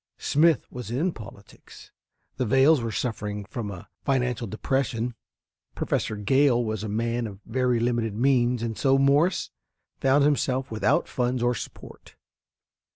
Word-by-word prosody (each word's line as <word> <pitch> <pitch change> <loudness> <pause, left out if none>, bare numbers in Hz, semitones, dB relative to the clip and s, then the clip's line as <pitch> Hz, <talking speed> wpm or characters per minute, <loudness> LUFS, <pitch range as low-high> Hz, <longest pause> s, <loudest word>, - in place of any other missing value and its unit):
Smith 155 0 +3
was 125 -3 -7
in 150 +10 0
politics, 115 -5 -13 0.5
the 130 - 0
Vails 135 +4 +5
were 115 -1 -3
suffering 105 -4 -3
from 115 -2 -5
a 95 -3 -9 0.2
financial 125 -3 0
depression, 120 +2 -1 0.6
Professor 110 - -1
Gale 120 +3 +2
was 110 -1 -3
a 110 - -4
man 115 +2 -1
of 100 -2 -10
very 125 0 +1
limited 115 -3 0
means, 125 -1 +2
and 115 -1 -3
so 135 +2 +3
Morse 145 +6 +2 0.5
found 135 +2 +3
himself 135 -3 +1
without 110 - +1
funds 125 -1 -1
or 120 0 +2
support. 115 - -10
120 Hz, 140 wpm, -26 LUFS, 110-135 Hz, 0.6 s, Vails